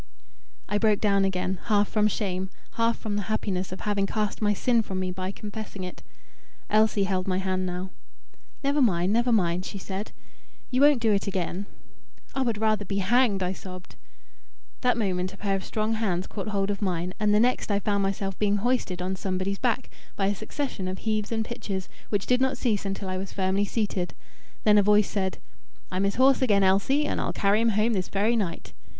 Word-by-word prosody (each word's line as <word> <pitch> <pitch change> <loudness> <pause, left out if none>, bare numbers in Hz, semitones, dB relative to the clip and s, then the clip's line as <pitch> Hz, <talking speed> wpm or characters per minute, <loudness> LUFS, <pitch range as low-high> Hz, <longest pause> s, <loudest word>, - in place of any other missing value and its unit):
I 205 - 0
broke 215 -2 +3
down 200 -2 +3
again, 185 -1 -1
half 205 -2 +3
from 215 -1 +2
shame, 190 -3 -2 0.2
half 230 0 +1
from 205 -2 -3
the - - 0
happiness 190 -4 -1
of 185 - -6
having 200 -1 0
cast 210 0 -2
my 210 -1 +3
sin 235 +3 +2
from 190 -3 -4
me 185 -1 -1
by 185 +1 -3
confessing 205 -2 -7
it. 180 - -7 0.7
Elsie 215 -1 +4
held 185 -1 -1
my 185 -1 +1
hand 185 -1 -1
now. 180 +1 -4 0.7
"Never 280 +1 +2
mind; 185 -5 +3
never 240 +2 +2
mind," 180 -5 +2
she 200 - -6
said; 195 +2 -5 0.6
"you 255 +1 +2
won't 290 -4 +6
do 220 - +4
it 200 - 0
again." 190 +1 -2 0.7
"I 270 - -1
would 235 -4 0
rather 215 -1 +1
be 195 0 -3
hanged," 200 0 +3
I 180 +1 0
sobbed. 185 -1 -10 0.9
That 250 -1 +2
moment 185 -4 -1
a - - -17
pair 200 -1 0
of 190 - -3
strong 215 +1 -1
hands 190 -5 0
caught 205 0 -6
hold 200 -1 0
of 200 - -4
mine, 180 -2 -1
and 210 0 +2
the 210 - +5
next 245 +1 +2
I 200 - +2
found 200 0 0
myself 195 0 -2
being 205 -1 +2
hoisted 205 -5 0
on 190 +1 -1
somebody's 190 +1 -2
back, 250 0 0 0.2
by 195 - 0
a 200 - +2
succession 240 -4 -4
of 185 +1 -3
heaves 215 0 -1
and 225 -1 0
pitches, 195 -5 -4 0.2
which 205 -2 0
did 250 0 +2
not 265 0 +2
cease 215 -5 0
until 195 0 -4
I 185 0 -2
was 190 +1 -5
firmly 195 +1 +1
seated. 200 -4 -2 0.5
Then 210 -1 +6
a - - +6
voice 210 0 +4
said 190 -2 -1 0.5
"I'm 185 +1 +1
his 200 - 0
horse 265 +2 +5
again, 205 -6 +4
Elsie, 200 +10 +3
and - - -1
I'll - - -1
carry 205 +2 +2
him 230 - +3
home 225 +2 +3
this 185 -3 -1
very 210 +4 +2
night." 195 -7 -3
200 Hz, 205 wpm, -26 LUFS, 190-220 Hz, 0.9 s, won't